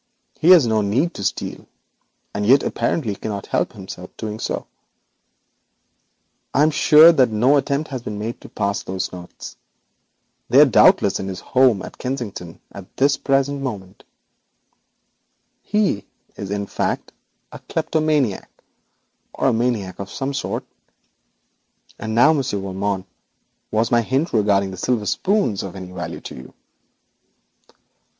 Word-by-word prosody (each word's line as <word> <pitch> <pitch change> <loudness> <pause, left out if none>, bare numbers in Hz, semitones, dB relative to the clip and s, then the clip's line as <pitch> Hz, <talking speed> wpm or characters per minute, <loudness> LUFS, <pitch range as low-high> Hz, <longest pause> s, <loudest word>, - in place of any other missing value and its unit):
He 165 - +3
has 175 -7 +8
no 110 -2 +2
need 125 - 0
to 100 - -7
steal, - - -3 0.7
and 100 - -2
yet 135 +6 +5
apparently 115 -11 -1
cannot 100 -1 -5
help - - -1 0.4
doing 110 0 -5
so. - - -3 1.9
I 145 - +5
am 155 - +4
sure 155 +2 +7
that 135 -7 +3
no 120 +6 +3
attempt 140 +2 -1
has 130 -2 -4
been 105 -3 -6
made 110 +3 -5
to - - -12
pass 100 -1 -2
those 95 0 -4
notes. 90 -1 -10 0.9
They - - +6
are - - +9
doubtless - - +4
resting 95 -1 -4
securely 130 +8 +3
in 115 - 0
his 95 - -7
house - - -6
at - - -11
Kensington. 115 -10 -5 3.0
He 205 - 0 0.3
is, 100 - -6
in 100 0 -2
fact, - - -3 0.4
a - - -9
kleptomaniac, 150 -9 -1 0.8
or - - +1
a - - +1
maniac 110 -6 -1
of 100 0 -6
some 140 0 -4
sort. 140 - -3 1.3
And 110 0 -4
now, 145 +7 +6
monsieur, 135 -8 -1
was 100 +3 -4
my 120 -1 +4
hint 135 +8 -1
regarding 100 -3 +2
the 95 - -8
silver 115 +1 -1
spoons 195 - 0
of 95 -1 -7
any 95 -1 -8
value 90 -2 -6
to - - -9
you?' 65 0 -12
110 Hz, 135 wpm, -21 LUFS, 100-135 Hz, 3.0 s, are